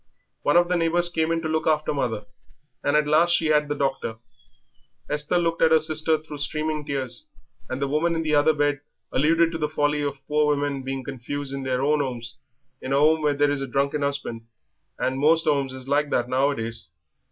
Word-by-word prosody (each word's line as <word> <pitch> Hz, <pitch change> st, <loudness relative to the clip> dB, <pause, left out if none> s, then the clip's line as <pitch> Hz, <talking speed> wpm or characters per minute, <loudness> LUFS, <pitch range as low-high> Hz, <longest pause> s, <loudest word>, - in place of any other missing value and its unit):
One 145 Hz, -, +3 dB
of 175 Hz, 0 st, +4 dB
the 180 Hz, -, 0 dB
neighbours 170 Hz, +1 st, +3 dB
came 160 Hz, -1 st, 0 dB
in 165 Hz, 0 st, -1 dB
to -, -, -1 dB
look 160 Hz, 0 st, -1 dB
after 155 Hz, -1 st, +1 dB
mother, 115 Hz, -7 st, -2 dB, 0.6 s
and 145 Hz, -, +1 dB
at 150 Hz, -, +2 dB
last 165 Hz, +4 st, +4 dB
she 165 Hz, -, 0 dB
had 150 Hz, -1 st, +3 dB
the 145 Hz, -, -2 dB
doctor." 135 Hz, -5 st, -2 dB, 0.9 s
Esther 150 Hz, +4 st, 0 dB
looked 165 Hz, -1 st, 0 dB
at 160 Hz, -, +6 dB
her 160 Hz, 0 st, +5 dB
sister 155 Hz, 0 st, +1 dB
through 155 Hz, -1 st, -10 dB
streaming 155 Hz, +1 st, -2 dB
tears, 135 Hz, -, -3 dB, 0.4 s
and 130 Hz, -, -3 dB
the 140 Hz, -, 0 dB
woman 160 Hz, +4 st, +1 dB
in 165 Hz, -, -1 dB
the 155 Hz, -1 st, -1 dB
other 150 Hz, +2 st, +4 dB
bed 145 Hz, -1 st, 0 dB, 0.3 s
alluded 165 Hz, +3 st, +3 dB
to 165 Hz, -, -4 dB
the 150 Hz, -1 st, -1 dB
folly 150 Hz, -1 st, 0 dB
of 140 Hz, -1 st, -4 dB
poor 150 Hz, 0 st, +2 dB
women 145 Hz, -2 st, 0 dB
being 135 Hz, 0 st, -4 dB
confined 135 Hz, +1 st, -5 dB
"in 135 Hz, 0 st, -4 dB
their 130 Hz, 0 st, -1 dB
own 150 Hz, +1 st, +2 dB
'omes 120 Hz, -4 st, -5 dB, 0.4 s
in 130 Hz, -, -3 dB
a -, -, +3 dB
'ome 155 Hz, +2 st, +4 dB
where 150 Hz, -1 st, +1 dB
there 145 Hz, 0 st, +2 dB
is 145 Hz, -1 st, -2 dB
a 135 Hz, -, -3 dB
drunken 140 Hz, +3 st, 0 dB
'usband, 140 Hz, -5 st, -2 dB, 0.5 s
and 130 Hz, +1 st, -1 dB
most 160 Hz, +3 st, +3 dB
'omes 140 Hz, -3 st, +1 dB
is 130 Hz, 0 st, -9 dB
like 145 Hz, +1 st, +1 dB
that 120 Hz, -3 st, 0 dB
nowadays." 125 Hz, -, -1 dB
145 Hz, 210 wpm, -24 LUFS, 135-155 Hz, 0.9 s, at